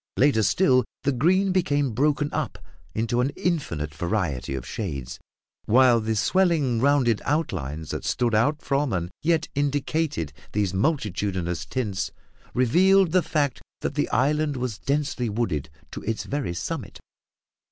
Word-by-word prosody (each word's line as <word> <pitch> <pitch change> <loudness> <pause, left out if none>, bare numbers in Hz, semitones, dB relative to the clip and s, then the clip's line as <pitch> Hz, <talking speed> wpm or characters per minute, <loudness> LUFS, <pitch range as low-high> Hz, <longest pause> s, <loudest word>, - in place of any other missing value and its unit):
Later 135 -4 +4
still, 130 - +4 0.2
the 140 - +2
green 185 +9 +2
became 145 -7 +1
broken 145 +5 +1
up - - -2 0.4
into 115 +2 +1
an 130 - +1
infinite 85 - -2
variety 80 - -2
of 65 -2 -5
shades; 70 - -5 0.5
while 125 0 +5
the 110 0 -1
swelling 155 - +2
rounded 130 -5 +3
outlines 80 - -2
that - - -4
stood 120 -2 0
out 145 +8 +2
from 140 -3 0
and 85 -1 -2
yet 165 0 +1
indicated 145 - -1 0.2
these 100 -3 0
multitudinous 95 - -1
tints, 100 - -2 0.4
revealed 180 +9 +4
the 185 +1 +4
fact 145 -6 -1 0.2
that - - -2
the - - 0
island 145 +2 +1
was 125 -5 -3
densely 140 -4 -1
wooded 100 - -2 0.2
to - - -6
its 110 0 -2
very 135 -11 -3
summit. - - -5
125 Hz, 140 wpm, -25 LUFS, 100-150 Hz, 0.5 s, while